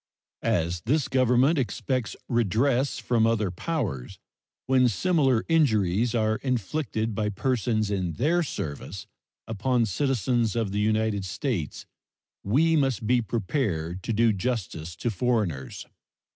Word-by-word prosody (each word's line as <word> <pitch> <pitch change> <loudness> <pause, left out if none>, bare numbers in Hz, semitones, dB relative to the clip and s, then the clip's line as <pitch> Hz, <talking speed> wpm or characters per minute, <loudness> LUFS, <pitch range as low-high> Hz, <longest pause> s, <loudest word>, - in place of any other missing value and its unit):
As 85 +1 0
this 145 +2 +2
Government 130 +4 +3
expects 130 -2 -2
redress 120 +4 +1
from 115 -2 +2
other 110 -4 +1
powers 95 - -3 0.5
when 130 -1 +4
similar 135 - +2
injuries 115 - +2
are 110 -1 +1
inflicted 115 -2 -2
by 105 0 -1
persons 110 -1 0
in 90 -4 -1
their 155 - +1
service 95 - -5 0.4
upon 115 +2 +1
citizens 120 0 0
of 115 -4 -1
the 105 - -1
United 110 -1 +1
States, 95 - -3 0.6
we 155 +11 +3
must 135 -6 +1
be 120 +2 +3
prepared 95 - -2
to 115 - -3
do 115 0 +3
justice 95 -7 -3
to 120 - -2
foreigners. 95 - -1
115 Hz, 120 wpm, -26 LUFS, 100-130 Hz, 0.6 s, when